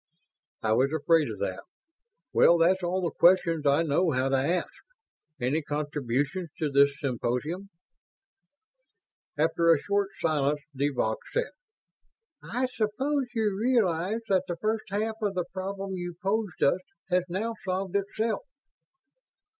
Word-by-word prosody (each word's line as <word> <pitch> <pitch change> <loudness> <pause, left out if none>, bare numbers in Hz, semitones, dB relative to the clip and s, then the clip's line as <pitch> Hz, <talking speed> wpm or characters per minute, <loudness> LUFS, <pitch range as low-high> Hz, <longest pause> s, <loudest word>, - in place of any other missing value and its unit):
"I 110 - +1
was 130 +4 +3
afraid 160 0 +3
of 110 - -5
that. 95 -2 -2 0.7
Well, 170 - +6
that's 180 +3 +3
all 180 +1 -1
the 170 - 0
questions 170 -4 +4
I 140 +4 +4
know 165 +3 +2
how 130 -2 +1
to 135 - +2
ask. 155 +7 0 0.7
Any 130 +6 0
contributions 145 +3 -2
to 150 -2 -1
this 140 +1 +4
symposium?" 140 +8 -2 1.7
After 165 +2 +3
a 165 - +6
short 200 +3 0
silence 150 -1 +1
de 140 +2 +1
Vaux 110 -5 -1
said, 485 - -1 0.9
"I 250 +2 -1
suppose 260 +6 0
you 215 -3 +1
realize 215 -3 +1
that 190 -2 +2
the 175 - -3
first 215 +4 -1
half 215 +2 -1
of 205 -2 -1
the 180 -2 0
problem 195 +1 -4
you 175 -2 -5
posed 200 0 -1
us 180 +6 +3 0.3
has 180 0 +3
now 215 +6 -2
solved 190 0 -2
itself?" 210 +2 -1
175 Hz, 140 wpm, -28 LUFS, 145-200 Hz, 1.7 s, Well